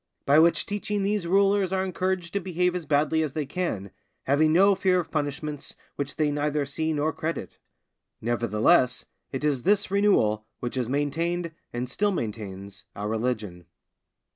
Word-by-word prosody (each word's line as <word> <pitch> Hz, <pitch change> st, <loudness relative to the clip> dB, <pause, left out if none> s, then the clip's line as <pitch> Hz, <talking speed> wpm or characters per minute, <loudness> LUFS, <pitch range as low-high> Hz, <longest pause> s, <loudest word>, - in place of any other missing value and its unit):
By 145 Hz, +3 st, +6 dB
which 165 Hz, +1 st, +4 dB
teaching 205 Hz, 0 st, -2 dB
these 200 Hz, -3 st, 0 dB
rulers 195 Hz, 0 st, +3 dB
are 190 Hz, 0 st, 0 dB
encouraged 185 Hz, -1 st, -2 dB
to 200 Hz, -, +1 dB
behave 180 Hz, -1 st, 0 dB
as 175 Hz, -4 st, -4 dB
badly 155 Hz, +2 st, +2 dB
as 155 Hz, -3 st, -2 dB
they 155 Hz, -2 st, -2 dB
can, 135 Hz, -, -3 dB, 0.3 s
having 150 Hz, +3 st, +3 dB
no 195 Hz, +5 st, +6 dB
fear 190 Hz, -1 st, +2 dB
of 175 Hz, -, -5 dB
punishments 145 Hz, -1 st, -3 dB, 0.2 s
which 140 Hz, 0 st, -3 dB
they 155 Hz, -2 st, +1 dB
neither 150 Hz, 0 st, 0 dB
see 160 Hz, +3 st, -1 dB
nor 155 Hz, +1 st, 0 dB
credit. 160 Hz, +2 st, -4 dB, 0.6 s
Nevertheless, 120 Hz, +2 st, +2 dB, 0.3 s
it 135 Hz, +1 st, -4 dB
is 145 Hz, -4 st, +1 dB
this 205 Hz, +5 st, +2 dB
renewal 110 Hz, -, +2 dB
which 120 Hz, -, -4 dB
has 125 Hz, -3 st, -2 dB
maintained, 165 Hz, +5 st, -1 dB, 0.2 s
and 120 Hz, +1 st, -3 dB
still 205 Hz, +11 st, 0 dB
maintains, 100 Hz, -, -5 dB
our 105 Hz, +1 st, -4 dB
religion. 110 Hz, -6 st, -3 dB
155 Hz, 160 wpm, -26 LUFS, 125-180 Hz, 0.6 s, By